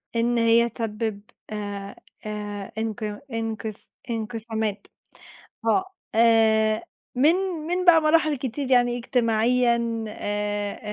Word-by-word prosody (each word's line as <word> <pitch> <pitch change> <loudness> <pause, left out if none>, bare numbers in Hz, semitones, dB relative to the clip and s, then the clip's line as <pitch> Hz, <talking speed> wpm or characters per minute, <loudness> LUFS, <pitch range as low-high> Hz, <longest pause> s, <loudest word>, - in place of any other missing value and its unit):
إن 235 +1 +2
هي 230 +1 +4
تسبب، 220 -2 -3 0.3
آآ، 205 -2 -5 0.3
آآ، 205 -2 -5
إنق 215 -1 -3
إنقس 220 -1 -4 0.2
إنقسامات. 220 -2 -3 0.8
آه، 375 +12 +3 0.3
آآ، 220 -1 +4 0.3
من 300 +7 +5 0.3
من 360 +1 -1
بقى 330 -2 +7
مراحل 310 -2 +3
كتير 260 +1 -4
يعني 245 -1 +4
اجتماعيًا 235 -1 +1
آآ، 205 -1 -3
225 Hz, 100 wpm, -25 LUFS, 215-240 Hz, 0.8 s, بقى